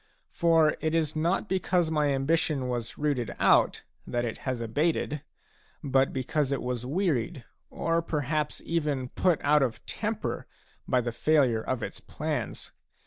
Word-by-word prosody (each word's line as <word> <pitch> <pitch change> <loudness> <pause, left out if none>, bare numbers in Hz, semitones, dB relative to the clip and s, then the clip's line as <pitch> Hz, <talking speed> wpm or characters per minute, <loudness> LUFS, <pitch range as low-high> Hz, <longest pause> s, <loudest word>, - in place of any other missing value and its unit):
For 165 -2 +3
it 160 +1 0
is 160 -2 +1
not 170 +6 +1
because 180 -3 +1
my 150 -2 +2
ambition 140 0 +1
was 120 -2 -3
rooted 130 -8 -1
out - - +4 0.2
that 120 0 -1
it 115 - -4
has 130 -2 -1
abated, 145 +5 0 0.6
but 135 -1 +2
because 135 +2 -1
it 140 - -1
was 125 -1 -3
wearied 150 - 0 0.3
or 165 0 0
perhaps 150 -1 -2
even 150 -6 -1
put 180 +2 +2
out 150 +1 +5
of 125 -4 -1
temper - - -3 0.4
by 125 - +3
the 120 0 -2
failure 125 -2 +3
of 120 0 -2
its - - -5
plans. - - -4
145 Hz, 145 wpm, -28 LUFS, 125-160 Hz, 0.6 s, out